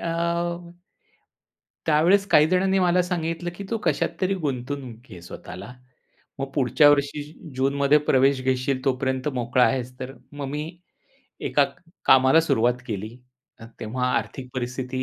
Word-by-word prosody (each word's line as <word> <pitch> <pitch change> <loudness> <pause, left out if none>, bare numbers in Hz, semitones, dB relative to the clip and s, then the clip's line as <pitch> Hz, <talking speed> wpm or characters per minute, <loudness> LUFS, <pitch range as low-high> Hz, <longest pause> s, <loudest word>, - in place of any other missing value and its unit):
अ, 170 - -3 1.8
त्यावेळेस 175 +6 +4
काहीजणांनी 185 +5 +4
मला 180 0 +3
सांगितलं, 175 -1 -3
की 200 - -7
तू 230 - +1
कशात 155 -4 +1
तरी 190 +1 +1
गुंतवून 130 -5 -5
घे 90 -3 -10
स्वतःला. 90 +2 -9 0.7
मग 135 0 -4
पुढच्या 130 +1 +4
वर्षी 145 0 +1 0.3
जूनमध्ये 140 +2 +3
प्रवेश 135 0 +4
घेशील 130 +1 0
तोपर्यंत 130 +1 0
मोकळा 125 +1 +2
आहेस, 125 -1 -1
तर 130 +1 -5 0.2
मग 145 -1 -5
मी 150 +2 -3 0.8
एका - - +3
क - - -10 0.3
कामाला 130 +4 +6
सुरुवात 120 -5 +1
केली. 105 -1 -4 0.5
अ, - - -10 0.2
तेव्हा 125 +4 -2
आर्थिक 130 -2 -4
परिस्थिती 130 +1 -3
135 Hz, 130 wpm, -24 LUFS, 125-155 Hz, 1.8 s, कामाला